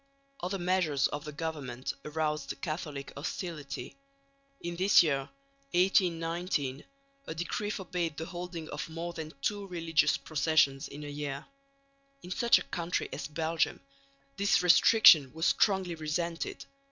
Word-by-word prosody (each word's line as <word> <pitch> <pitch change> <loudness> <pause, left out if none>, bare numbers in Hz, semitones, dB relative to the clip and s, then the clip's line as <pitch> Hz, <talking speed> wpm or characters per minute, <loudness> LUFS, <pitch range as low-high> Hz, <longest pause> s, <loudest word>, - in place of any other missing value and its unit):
Other 185 +3 -2
measures 175 -6 +1
of 145 0 -5
the 150 - -5
government 145 -5 -4
aroused 150 -2 -2
Catholic 150 -4 -5
hostility. 150 -1 -5 0.6
In 170 0 -5
this 190 +1 +6
year, 140 -4 0 0.4
1819, 170 -6 +1 0.4
a 160 - -5
decree 175 +5 -2
forbade 180 -6 -3
the 160 - -4
holding 175 -2 -6
of 150 +2 -5
more 170 +2 -5
than 160 -2 -6
two 205 -1 -1
religious 165 -4 +2
processions 140 -1 +2
in 150 +1 -9
a - - -6
year. 145 -1 -5 0.8
In 180 - -9
such 235 +4 +5
a - - -3
country 170 0 -2
as - - -4
Belgium 160 +2 -1 0.6
this 200 -2 +3
restriction 170 - +7
was 160 +2 -2
strongly 190 -4 +2
resented. 165 +2 -3
165 Hz, 130 wpm, -30 LUFS, 150-180 Hz, 0.8 s, restriction